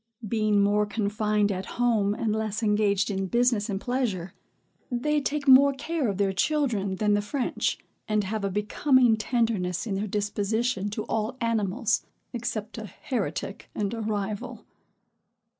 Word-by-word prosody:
Being 215 -1 +2
more 205 +1 +2
confined 210 0 0
at 185 0 -4
home, 220 -4 +2
and 220 -2 -1
less 220 0 -2
engaged 210 -1 +2
in 190 -1 -2
business 235 0 +2
and 195 -1 -1
pleasure, 225 -8 -2 0.6
they 295 +4 0
take 285 +1 -2
more 275 +1 +8
care 305 0 -2
of 200 -3 -2
their 195 -1 +1
children 215 -4 0
than 210 +1 +1
the 205 - +2
French, 250 +5 -1 0.3
and 215 -1 +1
have 210 +2 -3
a 200 - 0
becoming 230 +5 +3
tenderness 220 -6 0
in 210 - -3
their 200 +2 -2
disposition 210 +1 -1
to 210 +1 -4
all 220 +4 -2
animals, 225 0 0 0.3
except 225 -2 -4
a 215 - -6
heretic 205 - -4
and 205 +1 -1
a 225 - -4
rival. 210 -1 -3
215 Hz, 150 wpm, -26 LUFS, 200-240 Hz, 0.6 s, more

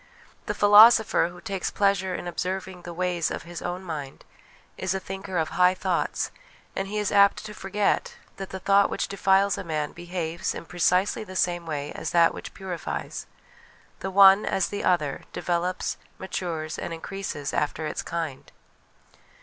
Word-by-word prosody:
The - - -1
philosopher, 215 -1 +7
who 175 0 -12
takes 190 +1 -3
pleasure 195 -2 +1
in 175 - -5
observing 185 +1 -4
the 175 - -8
ways 175 -1 0
of - - -5
his 175 0 -8
own 180 +1 -4
mind, 150 -6 -6 0.5
is 185 0 -2
a - - -1
thinker 190 -1 -5
of 160 -1 0
high 180 +1 +4
thoughts, - - -1 0.4
and 195 - -2
he 210 +2 -4
is 210 -1 0
apt 200 +1 +4
to 210 - -7
forget 200 +1 -1 0.2
that 195 -1 -6
the 190 - -5
thought 200 +1 +4
which - - -2
defiles 195 0 +2
a - - -4
man 155 -3 -2
behaves 170 -1 -4
in - - -7
precisely 180 +5 +1
the 185 -3 -10
same 175 -2 0
way 145 -2 -3
as - - -4
that 170 -1 +5
which - - -9
purifies: 185 -3 -5 0.7
the 190 - -3
one, 195 +1 +7
as 190 - 0
the 205 - -4
other, 150 -6 +1
develops, 175 +1 -1 0.2
matures, 170 -4 -4
and 165 - -4
increases 165 -4 -5
after 150 +1 -1
its 150 - -3
kind. 165 -5 -5
185 Hz, 165 wpm, -26 LUFS, 170-195 Hz, 0.7 s, philosopher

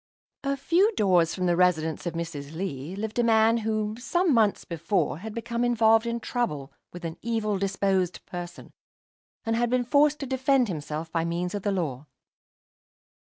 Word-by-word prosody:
A 275 0 -1
few 345 - +3
doors 180 -5 +3
from 185 - -2
the 175 -1 +3
residence 170 -2 +1
of 170 - -3
Mrs. 160 -3 -5
Lee 160 -2 -4
lived 220 +3 -4
a - - +4
man 225 0 +4
who, 215 -1 -1
some 345 +5 +1
months 220 -4 +2
before, 165 -2 -1
had 220 +4 -6
become 235 +1 -2
involved 225 -1 +4
in 235 0 -1
trouble 155 - -3 0.2
with 175 -1 -8
an 165 0 -5
evil 220 -4 -1
disposed 190 -2 0
person, 175 -1 -8 0.7
and 230 +1 +1
been 250 0 +2
forced 295 +3 +4
to - - -2
defend 260 -2 +2
himself 155 -1 -5
by 165 -1 0
means 175 +2 -2
of 205 - -3
the 205 - 0
law. 150 -7 -3
205 Hz, 165 wpm, -26 LUFS, 170-235 Hz, 0.7 s, a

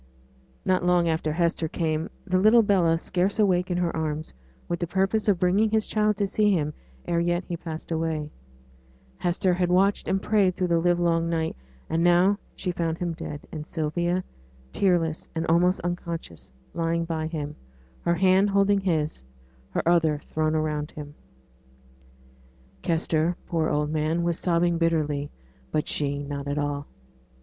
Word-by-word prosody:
Not 185 -1 +2
long 175 -1 +3
after 160 -1 0
Hester 170 0 0
came, 160 +1 -2 0.2
the 185 -1 +1
little 220 +4 +6
Bella 180 -5 +3
scarce 185 +4 -1
awake 185 -4 +2
in 175 - 0
her 175 -1 0
arms, 155 -1 -3 0.3
with 170 - -2
the 175 - -2
purpose 195 +4 0
of 200 -3 +4
bringing 190 +5 +3
his 220 0 +1
child 210 -1 +1
to 205 - +1
see 210 +1 +2
him 150 -5 0 0.3
ere 170 - 0
yet 175 +1 0
he 175 - -4
passed 165 -1 -7
away. 160 -2 -2 0.9
Hester 180 +1 +1
had 180 0 0
watched 195 +3 +2
and 195 - +1
prayed 195 -3 +2
through 180 -1 0
the 170 -1 +3
livelong 170 -1 +2
night. 160 -1 -1 0.3
And 165 +1 0
now 180 +4 +4 0.2
she 180 - -2
found 165 -2 -2
him 175 -1 -2
dead, 155 -3 -6
and 155 -1 -6
Sylvia, 175 +3 -1 0.5
tearless 170 -5 +1
and 160 0 -1
almost 175 +3 +3
unconscious, 165 - -5 0.2
lying 165 0 0
by 160 -1 -2
him, 150 -2 -4 0.5
her 170 - +1
hand 190 +3 +4
holding 200 0 +3
his, 160 - -1 0.5
her - - -2
other 165 -3 +3
thrown 155 +1 -1
around 150 -1 -1
him. 145 -1 -9 1.7
Kester, 165 -1 +1
poor 160 -2 0
old 150 0 0
man, 155 +2 0
was 170 -1 -1
sobbing 170 -1 +1
bitterly; 150 -4 0 0.4
but 155 - 0
she 145 -1 -1
not 140 0 -5
at 145 +1 -2
all. 145 -1 -2
170 Hz, 160 wpm, -26 LUFS, 155-180 Hz, 1.7 s, little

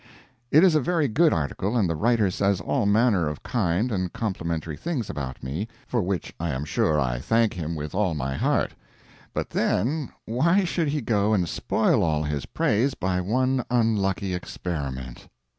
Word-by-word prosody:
It 155 +5 +6
is 185 -3 +6
a 155 - +3
very 165 0 +1
good 155 +7 +3
article 95 - -1
and 105 -5 +3
the 85 - -1
writer 110 +2 +2
says 100 0 +1
all 85 +5 0
manner 105 -5 +3
of 75 - -7
kind 110 0 0
and 95 -4 -1
complimentary 85 -7 -3
things 145 - -3
about 65 -3 -6
me 75 +12 -3 0.2
for 120 - 0
which 95 -3 -3
I 85 +1 -2
am 70 0 -2
sure 75 0 +1
I - - 0
thank 115 - +2
him 85 -2 -4
with 75 -1 -5
all 95 -4 +1
my 70 -2 -2
heart; - - +1 0.6
but - - -3
then 135 - 0 0.2
why 170 - +2
should 170 -2 0
he 145 +1 -1
go 110 -2 +2
and 90 -4 +1
spoil - - +1
all 75 -2 +1
his 75 -2 -3
praise 125 +6 +1
by 90 -1 -1
one 130 +6 +1
unlucky 100 -5 +1
experiment? 70 -8 -5
100 Hz, 175 wpm, -25 LUFS, 80-120 Hz, 0.6 s, It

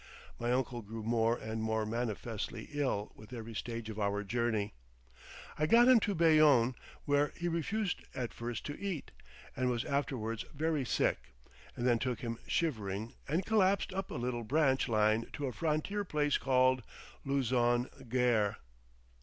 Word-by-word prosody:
My 120 +1 0
uncle 125 -1 0
grew 110 +1 -7
more 115 +1 +2
and 110 0 -4
more 110 0 0
manifestly 115 -1 -3
ill 130 -8 -1
with 110 +2 -14
every 115 -1 -6
stage 115 +1 -4
of 110 -1 -6
our 100 0 0
journey. 110 -1 -1 0.9
I 155 - +2
got 235 +7 +7
him 255 -2 +8
to 205 -2 -1
Bayonne, 155 -7 +5 0.3
where 145 0 +2
he 175 - -2
refused 180 +4 -1
at 125 -2 -3
first 120 -1 -5
to 145 - -5
eat, 195 -7 -4 0.4
and 130 0 +1
was 120 -2 -1
afterwards 125 -6 -2
very 155 -2 0
sick, - - 0 0.4
and 120 - -3
then 120 -2 +4
took 125 -3 -2
him 115 -1 -4
shivering 110 - -1
and 165 +6 0
collapsed 200 -4 +2
up 195 0 -3
a - - -6
little 120 -1 -2
branch 135 +1 +2
line 110 0 +2
to 145 - -3
a 130 - -3
frontier 165 +6 -1
place 150 -5 +1
called 130 -1 +3 0.4
Luzon 125 -2 +2 0.2
Gare. 115 -4 +2
125 Hz, 155 wpm, -33 LUFS, 115-150 Hz, 0.9 s, him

